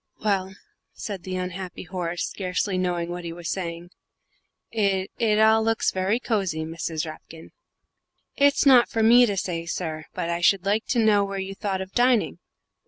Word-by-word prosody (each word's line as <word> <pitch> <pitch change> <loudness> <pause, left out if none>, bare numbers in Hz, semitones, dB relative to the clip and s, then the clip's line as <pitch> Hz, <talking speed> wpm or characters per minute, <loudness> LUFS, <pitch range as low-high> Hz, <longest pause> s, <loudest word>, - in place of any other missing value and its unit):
"Well," 190 -2 0 0.4
said 200 -4 -6
the 185 +2 -5
unhappy 185 0 -5
Horace, 175 -1 -3
scarcely 185 +1 -2
knowing 175 -2 -1
what 175 0 -5
he 170 - -5
was 170 0 -5
saying, 175 -1 -5 0.8
"it 195 -3 0
it 220 -3 +2
all 220 +1 +5
looks 225 0 +1
very 190 +5 0
cosy, 195 -10 -1
Mrs. 165 0 -4
Rapkin." 160 +1 -11 0.8
"It's 285 +1 +3
not 255 -3 +6
for 225 - 0
me 240 +2 +7
to 200 -2 -2
say, 170 -3 -3
sir; 160 -2 -4
but 180 -2 -2
I 170 0 -2
should 190 +1 +3
like 210 +3 0
to 250 - 0
know 205 -2 +4
where 200 0 -4
you 195 0 -4
thought 195 -1 -3
of 190 0 -7
dining?" 245 -1 +2
190 Hz, 170 wpm, -24 LUFS, 175-215 Hz, 0.8 s, me